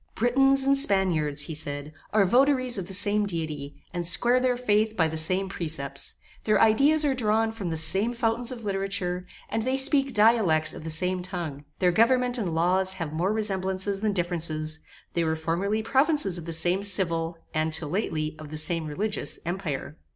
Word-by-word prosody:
Britons 270 +3 +3
and 275 +1 +3
Spaniards, 180 - +2
he 160 - -6
said, 145 0 -5 0.2
are 210 -2 +3
votaries 255 +2 +2
of 180 - -6
the 190 - -7
same 205 +1 +1
Deity, 155 -5 -5 0.2
and 175 -1 -3
square 240 +9 +3
their 250 -1 +1
faith 220 -2 +1
by 165 - +3
the 160 - -5
same 185 +5 +2
precepts; 150 -7 -2 0.3
their 215 -2 +2
ideas 280 +8 +4
are 280 - +2
drawn 225 -2 +1
from 210 -6 -5
the 160 - -3
same 190 +9 +4
fountains 235 +1 -1
of 240 -3 -8
literature, 195 -3 -3 0.2
and 225 - -2
they 260 +3 -1
speak 275 0 +2
dialects 210 -9 +3
of - - -9
the 160 - -5
same 180 +3 0
tongue; 170 -6 -5
their 180 -1 +2
government 245 +4 +2
and 175 -7 -2
laws 185 +3 +1
have 165 -5 -5
more 175 +5 0
resemblances 195 -2 -1
than 215 -1 +1
differences; 160 -4 -1 0.3
they 170 - 0
were 160 -1 0
formerly 185 +7 -2
provinces 265 - +2
of 170 - -10
the - - -4
same 175 +4 +1
civil, 170 -4 -1 0.2
and 155 +1 0
till 155 -1 -3
lately, 155 -5 -2
of 155 -1 -9
the 155 - -6
same 160 +1 -1
religious, 205 +8 -3
Empire. 160 -4 -4
190 Hz, 185 wpm, -26 LUFS, 160-225 Hz, 0.3 s, ideas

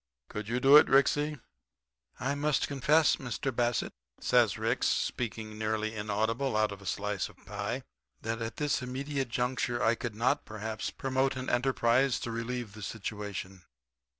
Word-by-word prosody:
Could 105 0 -5
you 120 +2 0
do 135 +3 +8
it, - - +6
Ricksy?' 145 +2 +3 0.8
"'I 130 +2 0
must 145 0 +1
confess, 145 +2 +3
Mr. 130 0 -3
Bassett,' 120 -2 0 0.3
says - - +3
Ricks, - - +1
speaking 110 -2 -2
nearly 110 0 -1
inaudible 110 +4 0
out 110 -1 +2
of 100 -1 -8
a 95 - -9
slice 105 -1 -2
of - - -18
pie, - - -3 0.4
'that 115 +1 -2
at 115 0 -4
this 150 -2 0
immediate 135 +1 -3
juncture 125 0 -1
I 115 - +4
could 115 -2 -4
not, 115 +3 +1
perhaps, 110 0 -4
promote 135 0 0
an 130 0 -3
enterprise 125 +1 +2
to 120 - -3
relieve 115 -1 -4
the 105 - -10
situation. 100 -2 -5
120 Hz, 155 wpm, -30 LUFS, 110-135 Hz, 0.8 s, do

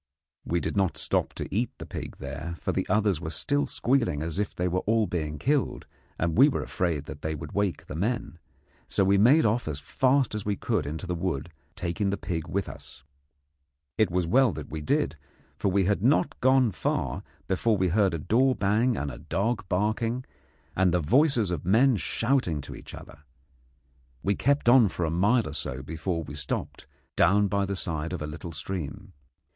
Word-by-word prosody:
We 85 - 0
did - - -3
not 95 -5 +1
stop - - 0
to - - -5
eat 115 +5 +1
the - - -8
pig - - -7
there, 75 +5 -6
for - - -1
the - - -2
others 100 -4 +2
were 80 - -4
still 145 - 0
squealing 120 - +1
as 85 +3 -3
if 105 - -2
they 90 - 0
were 90 +1 0
all 110 0 +3
being 75 -5 -3
killed, 140 - 0 0.3
and 80 0 0
we 135 +6 +7
were 140 - -2
afraid 85 -7 -1
that 75 -1 -9
they 80 0 -2
would 75 0 -7
wake 100 -3 -1
the - - -7
men; 100 0 -2 0.5
so 100 - +1
we 100 +1 +4
made 135 +10 +6
off 110 0 +1
as 75 -2 -3
fast 130 - +1
as 105 -1 -3
we 105 -1 -1
could 95 - -1
into 80 +5 -5
the 90 - -2
wood, 85 -3 -3 0.2
taking 95 +4 -1
the 100 - -1
pig 85 -5 -4
with 100 +1 -2
us. 65 - -10 0.9
It 110 - +3
was 90 0 0
as - - -5
well 130 +1 +5
that 75 -3 -8
we 80 - -4
did, 75 - 0 0.4
for 100 - 0
we 95 +1 +2
had 100 0 +1
not 140 +4 +2
gone 130 -2 +4
far 65 -7 -2 0.2
before 105 +3 +1
we 95 -1 +1
heard 95 -1 +2
a - - -1
door 125 - +2
bang 110 +4 +2
and 70 -1 -2
a - - -9
dog 100 +2 -2
barking, 110 +6 0 0.5
and 95 -1 +3
then 90 - +2
the 75 - -5
voices 125 - +3
of 85 -5 -3
men 120 +8 +4
shouting 110 - 0
to - - -8
each - - -10
other. 70 - -12 1.0
We 100 - +2
kept 140 +4 +1
on 120 -2 +7
for 90 -2 -2
a 80 - -1
mile 105 +8 +3
or - - -6
so 65 +1 -4
before 80 +3 -3
we 75 - -9
stopped, 70 -2 -5 0.3
down 100 +3 +4
by 100 0 0
the 100 - -2
side 80 -2 -3
of 90 - -4
a - - -3
little 80 +3 -7
stream. 90 +4 -6
95 Hz, 205 wpm, -27 LUFS, 80-115 Hz, 1.0 s, we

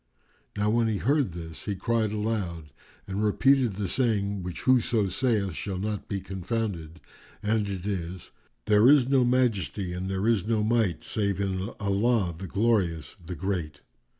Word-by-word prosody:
Now 105 +1 +2
when 115 0 +2
he 110 -2 0
heard 135 - +1
this, 80 -2 -8
he 100 - -2
cried 110 +2 0
aloud 100 -8 -3 0.3
and 100 +2 -2
repeated 125 +2 +3
the 100 -1 -2
saying 100 -4 0
which 90 -1 -6
whoso 120 -5 +3
saith 105 -3 0
shall 95 +4 -4
not 105 +2 -3
be 100 - -2
confounded, 95 -3 -4 0.4
and 105 -1 +1
it 95 -2 -5
is, 90 -3 -4 0.3
"There 105 +3 +5
is 140 -4 +6
no 135 -1 +4
Majesty 110 -7 +1
and 90 +2 -4
there 95 +2 -1
is 110 -4 +2
no 110 -2 +1
Might 110 -7 +1
save 100 -3 -1
in 95 0 -1
Allah, 100 -1 +1
the 95 +3 -7
Glorious, 95 -6 0
the 90 +2 -6
Great!" 85 -4 -3
100 Hz, 160 wpm, -27 LUFS, 95-115 Hz, 0.4 s, is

